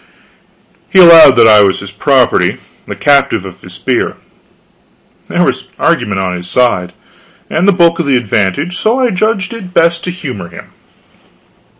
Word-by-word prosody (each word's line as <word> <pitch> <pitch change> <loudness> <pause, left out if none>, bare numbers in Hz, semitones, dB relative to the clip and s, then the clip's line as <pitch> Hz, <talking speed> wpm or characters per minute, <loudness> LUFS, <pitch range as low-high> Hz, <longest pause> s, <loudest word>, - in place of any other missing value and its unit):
He - - -1
allowed 165 -7 +7
that 115 -2 +4
I 105 -1 +6
was 95 -2 +1
his 100 -1 -10
property, 130 +4 0 0.3
the - - -6
captive 140 -8 0
of 95 -1 -12
his 90 -1 -11
spear. 125 +8 -3 1.1
There - - -1
was - - -2
argument 105 -2 -1
on 90 -1 -3
his 90 0 -8
side 90 -8 0 0.6
and 175 +5 0
the - - +5
bulk 170 -3 +1
of 170 - -2
the 135 -2 +2
advantage 120 - -2
so 230 +4 0
I 250 -2 0
judged 215 +2 -2
it 190 -5 -11
best 170 0 +1
to - - -4
humor 130 - -7
him. - - -14
140 Hz, 165 wpm, -11 LUFS, -, 1.1 s, allowed